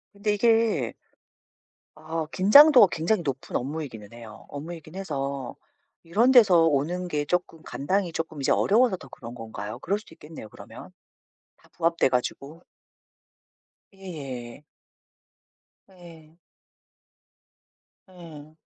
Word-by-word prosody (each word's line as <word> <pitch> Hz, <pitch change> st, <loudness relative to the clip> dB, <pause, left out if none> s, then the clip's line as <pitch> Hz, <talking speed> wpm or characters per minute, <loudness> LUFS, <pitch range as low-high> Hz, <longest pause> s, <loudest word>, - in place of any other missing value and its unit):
근데 205 Hz, +1 st, -1 dB
이게 225 Hz, +1 st, +1 dB, 1.0 s
아 160 Hz, +1 st, -4 dB
긴장도가 255 Hz, +5 st, +7 dB
굉장히 170 Hz, +5 st, 0 dB
높은 135 Hz, -3 st, -5 dB
업무이기는 125 Hz, -7 st, -5 dB
해요. 115 Hz, -3 st, -12 dB
업무이긴 155 Hz, +2 st, -9 dB
해서 140 Hz, -8 st, -5 dB, 0.5 s
이런 215 Hz, +10 st, +2 dB
데서 195 Hz, -10 st, +6 dB
오는 165 Hz, +4 st, 0 dB
게 150 Hz, -3 st, -2 dB
쪼끔 175 Hz, 0 st, -2 dB
감당이 185 Hz, +5 st, -2 dB
쪼끔 160 Hz, -3 st, -5 dB
이제 135 Hz, -, +1 dB
어려워서 230 Hz, 0 st, +3 dB
더 -, -, -14 dB
그런 120 Hz, 0 st, -10 dB
건가요? 110 Hz, -3 st, -7 dB
그럴 200 Hz, +3 st, -2 dB
수도 185 Hz, -6 st, -17 dB
있겠네요, 150 Hz, -8 st, -11 dB
그러면. -, -, -13 dB, 0.7 s
다 -, -, -26 dB
부합돼 170 Hz, -3 st, +1 dB
가지고. 140 Hz, +5 st, -4 dB, 1.3 s
예예. 140 Hz, -10 st, -8 dB, 1.3 s
예. 165 Hz, -4 st, -16 dB, 1.7 s
예. 160 Hz, -4 st, -13 dB
165 Hz, 240 characters per minute, -25 LUFS, 140-190 Hz, 1.7 s, 긴장도가